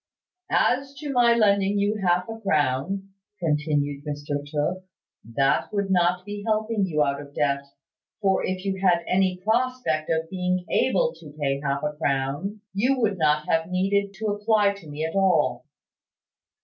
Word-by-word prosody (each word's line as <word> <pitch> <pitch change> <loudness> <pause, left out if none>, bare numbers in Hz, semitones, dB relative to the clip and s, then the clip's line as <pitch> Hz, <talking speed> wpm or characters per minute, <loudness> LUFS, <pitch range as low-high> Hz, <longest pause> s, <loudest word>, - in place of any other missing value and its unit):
"As 275 +2 +1
to 290 +1 -5
my 240 -2 +4
lending 200 -2 +3
you 205 +1 +1
half 180 0 +2
a 225 0 -7
crown," 165 +2 0 0.3
continued 150 -3 0
Mr 145 -1 -4
Tooke, 155 +5 -1 0.4
"that 125 +3 +1
would 200 -2 -1
not 180 0 +2
be 205 0 -6
helping 215 -2 0
you 155 -4 +2
out 140 0 -1
of 145 0 -13
debt; 140 -1 0 0.5
for 195 -2 +2
if 185 +1 -3
you 190 -1 -2
had 185 -2 +5
had 170 0 -2
any 185 0 +1
prospect 220 -8 0
of 160 0 0
being 180 0 -1
able - - +2
to 150 -1 -13
pay 135 -1 0
half 140 -1 -1
a 150 - -1
crown, 145 +8 -2
you 250 +7 +1
would 205 -5 0
not 150 -1 +2
have 165 +1 +1
needed 195 +2 +1
to 215 +2 -2
apply 205 0 +2
to 190 -6 -13
me 150 +2 -3
at 160 - -4
all." 160 -9 +2
185 Hz, 165 wpm, -25 LUFS, 150-205 Hz, 0.5 s, had